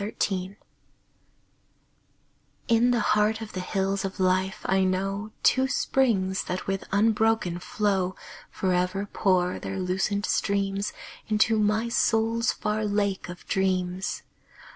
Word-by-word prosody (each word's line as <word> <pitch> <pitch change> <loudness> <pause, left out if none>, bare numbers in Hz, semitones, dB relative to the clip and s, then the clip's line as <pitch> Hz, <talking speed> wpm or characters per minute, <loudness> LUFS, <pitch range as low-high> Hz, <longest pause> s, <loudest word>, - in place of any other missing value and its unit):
My 205 +2 -5
Springs 190 0 -1 2.1
In 235 0 +4
the 240 -2 +2
heart 215 +1 +2
of 220 -1 -8
the 185 - -3
Hills 195 +1 -1
of 195 +1 -5
Life, 185 +1 0
I 190 0 +2
know 195 +3 -1
Two 260 0 +4
springs 205 -9 +1
that 180 +1 -4
with 195 0 -2
unbroken 215 -3 +2
flow 190 -1 -1 0.3
Forever 185 +1 0
pour 185 -3 +1
their 195 - -5
lucent 190 +3 -1
streams 200 0 0 0.4
Into 215 +1 +3
my 215 +2 +1
soul's 230 0 +2
far 215 0 -2
Lake 200 -3 -1
of 175 0 -9
Dreams. 185 -1 -1
195 Hz, 120 wpm, -26 LUFS, 185-215 Hz, 2.1 s, In